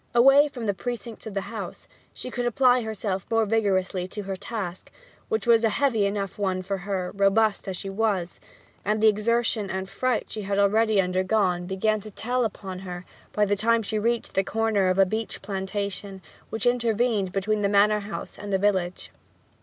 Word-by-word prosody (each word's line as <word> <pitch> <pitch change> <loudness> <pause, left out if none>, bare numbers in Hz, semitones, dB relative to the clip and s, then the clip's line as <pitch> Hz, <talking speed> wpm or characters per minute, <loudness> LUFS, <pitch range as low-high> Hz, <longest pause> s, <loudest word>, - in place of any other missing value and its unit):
Away 275 +4 +7
from 255 -6 -6
the 205 - +1
precincts 235 +1 -6
of 210 - -7
the 195 - 0
house - - -7 0.2
she 255 - -7
could 245 0 -1
apply 250 +1 +4
herself 205 -4 -3
more 225 -1 +3
vigorously 190 -4 0
to 205 +2 -6
her 195 0 -4
task, 190 -2 -6 0.4
which 440 - -1
was 235 -1 +5
a 225 - +4
heavy 225 -2 +2
one 205 - -3 0.4
enough 185 - -6
for 195 +1 -2
her, 185 -2 -1
robust 200 +2 +2
as 190 -2 -3
she 195 - -6
was; 195 -3 -1 0.4
and 210 +2 0
the 220 - +5
exertion 215 0 +1
and 190 0 -3
fright 250 +4 -1
she 215 - -4
had 200 0 -2
already 215 +1 +3
undergone 185 -1 +1
began 215 +3 +1
to 215 - -9
tell 245 +4 -1
upon 190 -3 -5
her 180 -1 -7 0.3
by 210 - +2
the 205 0 +1
time 230 +3 +2
she 215 +1 -2
reached 235 +2 -1
the 195 - +2
corner 220 -2 +1
of 185 0 +1
a 195 - +6
beech 220 +4 -3
plantation 195 0 -4 0.3
which 220 -2 -3
intervened 230 -4 +1
between 210 +2 0
the 200 - +2
manor 210 +1 +4
house 205 0 -7
and 205 0 -6
the 195 - +3
village. 190 -3 0
205 Hz, 190 wpm, -25 LUFS, 195-225 Hz, 0.4 s, Away